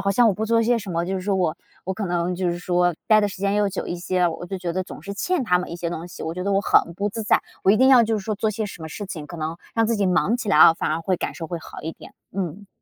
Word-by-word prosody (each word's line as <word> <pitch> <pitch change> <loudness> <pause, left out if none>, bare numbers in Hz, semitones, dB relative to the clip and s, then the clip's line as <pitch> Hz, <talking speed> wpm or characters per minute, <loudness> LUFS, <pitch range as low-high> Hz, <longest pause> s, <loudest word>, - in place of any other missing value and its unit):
好 195 - +1
像 235 +5 +4
我 205 - +2
不 215 - -2
做 230 +1 +3
些 235 +1 +2
什 205 -3 -7
么， 170 0 -1
就 190 +2 -2
是 190 - -2
说 200 +1 0
我 175 -4 0 0.3
我 190 - -2
可 205 0 -3
能 175 0 -1
就 180 0 0
是 170 - -3
说， 175 0 +1
待 215 -1 +6
的 205 - +1
时 195 - -8
间 200 +1 0
又 205 -1 +2
久 195 - -4
一 - - -3
些， 180 0 +1
我 165 +1 -6
就 190 +1 -4
觉 175 -2 -3
得 185 +2 -1
总 180 - -10
是 200 +3 -6
欠 340 - 0
他 180 -5 +3
们 180 - -5
一 170 - -5
些 175 -1 -3
东 170 0 -5
西， - - -9
我 160 - -3
觉 180 - -4
得 200 - 0
我 195 - +3
很 170 - +3
不 200 +4 -1
自 220 +2 -5
在。 210 - +3 0.2
我 190 - +6
一 210 - +5
定 260 +4 +5
要 255 -3 +8
就 220 -1 0
是 195 - -8
说 215 -1 -1
做 215 +2 0
些 215 0 -3
什 185 -4 -9
么 160 - -6
事 205 +6 -6
情， 155 -5 -6
可 170 - -9
能 160 +1 -3 0.2
让 225 -1 +3
自 230 0 +1
己 205 - +1
忙 185 +5 +2
起 225 -3 -5
来 190 - +4
哦， 160 - +9
反 - - -1
而 160 +1 -1
会 185 +2 0
感 - - -3
受 165 - -6
会 170 0 -4
好 - - -10
一 160 - -4
点， - - -14 0.2
嗯。 195 +1 -4
190 Hz, 370 characters per minute, -23 LUFS, 175-210 Hz, 0.3 s, 哦